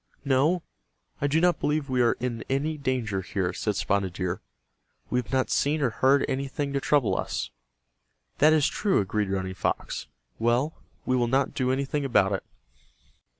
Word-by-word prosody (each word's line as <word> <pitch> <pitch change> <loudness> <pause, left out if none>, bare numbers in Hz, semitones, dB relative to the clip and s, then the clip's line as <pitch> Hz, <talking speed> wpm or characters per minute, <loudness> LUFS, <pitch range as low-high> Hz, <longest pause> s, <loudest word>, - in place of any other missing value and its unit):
"No, 145 +6 +2 0.6
I 145 - +2
do 150 +3 +2
not 175 +1 +3
believe 150 -1 0
we 130 -2 +1
are 120 - +4
in 120 -2 -4
any 145 +4 0
danger 125 -9 -1
here," 95 -1 -2
said 105 +2 -1
Spotted 100 -2 0
Deer. 90 0 -3 0.7
"We 125 - +2
have 125 - -6
not 130 -1 +1
seen 150 +2 +2
or 130 -5 +1
heard 135 +4 +3
anything 140 +1 -2
to 140 - +1
trouble 140 -3 +2
us." - - -3 0.9
"That 155 +2 +6
is 155 -2 +4
true," 205 -3 +1
agreed 105 0 -1
Running 95 -1 -2
Fox. 95 - -2 0.3
"Well, 120 +7 +2 0.3
we 130 - +2
will 120 -1 +2
not 135 +2 +1
do 130 -1 0
anything 140 +2 -1
about 105 -7 +3
it." 95 - -1
130 Hz, 170 wpm, -27 LUFS, 105-145 Hz, 0.9 s, That